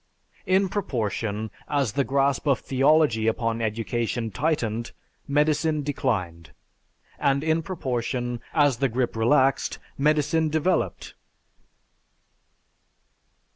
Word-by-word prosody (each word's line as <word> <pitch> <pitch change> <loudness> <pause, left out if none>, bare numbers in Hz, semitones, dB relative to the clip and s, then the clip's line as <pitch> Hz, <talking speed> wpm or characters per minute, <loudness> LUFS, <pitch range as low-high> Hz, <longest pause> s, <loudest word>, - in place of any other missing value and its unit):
In 190 +1 +3
proportion, 110 - -2 0.2
as 140 -6 0
the 140 +4 +1
grasp 140 +2 +1
of 135 -3 +4
theology 135 -4 +2
upon 115 0 0
education 115 +1 -2
tightened, 120 -4 -1 0.3
medicine 150 +1 +1
declined, 90 - -2 0.7
and 140 0 +1
in 160 +1 +1
proportion, 125 -8 -3
as 145 -5 +3
the 135 +2 +1
grip 120 0 -1
relaxed, 130 +4 +2 0.2
medicine 155 +2 +2
developed. 155 - -1
135 Hz, 95 wpm, -25 LUFS, 115-150 Hz, 0.7 s, of